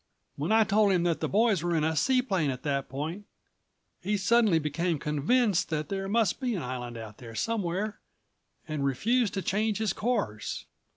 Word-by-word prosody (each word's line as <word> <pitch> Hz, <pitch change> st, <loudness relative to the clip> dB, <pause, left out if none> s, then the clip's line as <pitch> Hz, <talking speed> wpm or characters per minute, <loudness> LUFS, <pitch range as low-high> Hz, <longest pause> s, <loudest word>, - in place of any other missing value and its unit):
When 150 Hz, +7 st, -2 dB
I 220 Hz, 0 st, +6 dB
told 205 Hz, 0 st, +3 dB
him 180 Hz, -2 st, +2 dB
that 170 Hz, -2 st, +1 dB
the -, -, -2 dB
boys 215 Hz, -3 st, +3 dB
were 175 Hz, 0 st, 0 dB
in 155 Hz, -, +1 dB
a 160 Hz, +1 st, +1 dB
seaplane 195 Hz, -, +2 dB
at 130 Hz, -1 st, -4 dB
that 140 Hz, -2 st, -1 dB
point, 160 Hz, +10 st, -5 dB, 0.7 s
he 205 Hz, +3 st, 0 dB
suddenly 210 Hz, -2 st, +4 dB
became 160 Hz, +2 st, -1 dB
convinced 175 Hz, -, +1 dB
that 155 Hz, -2 st, -2 dB
there 195 Hz, -1 st, -3 dB
must 220 Hz, -3 st, +2 dB
be 250 Hz, -4 st, -1 dB
an 175 Hz, -, -3 dB
island 125 Hz, -2 st, -5 dB
out 110 Hz, -2 st, -9 dB
there 115 Hz, -2 st, -10 dB
somewhere 205 Hz, -, -2 dB, 0.7 s
and 155 Hz, -3 st, -2 dB
refused 210 Hz, -, +1 dB
to 195 Hz, -, -2 dB
change 210 Hz, +1 st, 0 dB
his 220 Hz, -2 st, 0 dB
course. 210 Hz, -, -2 dB
180 Hz, 180 wpm, -28 LUFS, 150-215 Hz, 0.7 s, I